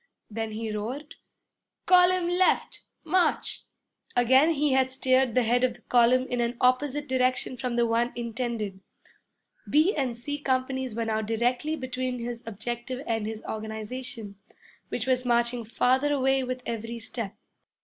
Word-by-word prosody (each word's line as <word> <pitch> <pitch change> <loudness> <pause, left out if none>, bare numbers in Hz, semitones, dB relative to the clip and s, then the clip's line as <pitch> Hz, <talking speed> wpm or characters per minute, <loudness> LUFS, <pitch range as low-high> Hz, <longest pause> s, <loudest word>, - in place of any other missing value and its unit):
Then 220 0 -3
he 220 0 -4
roared, 255 +9 -5 0.7
'Column 360 -1 +5
left! 360 +1 +1 0.2
March!' 370 -1 0 0.5
Again 260 +6 +5
he 295 -1 +1
had 260 0 +3
steered 260 -2 +2
the 250 - +4
head 245 +2 +2
of 250 -2 +2
the 240 - -18
column 250 +1 +4
in 245 -2 -2
an 235 0 -1
opposite 280 +3 +2
direction 255 0 +1
from 250 -1 -3
the 240 0 +3
one 235 +1 +1
intended. 235 -4 -3 0.9
B 315 +7 +4
and 260 -5 -1
C 290 +5 -4
companies 260 -3 -1
were 230 0 -1
now 220 -1 0
directly 245 +7 0
between 255 -2 -3
his 235 0 -5
objective 240 +4 -5
and 225 -2 -1
his 220 0 -6
organization, 220 0 -6 0.5
which 235 - -3
was 255 -1 +1
marching 240 0 +1
farther 260 +5 +2
away 270 -1 +2
with 255 0 -4
every 230 0 -4
step. 225 -2 -5
250 Hz, 150 wpm, -27 LUFS, 230-260 Hz, 0.9 s, Column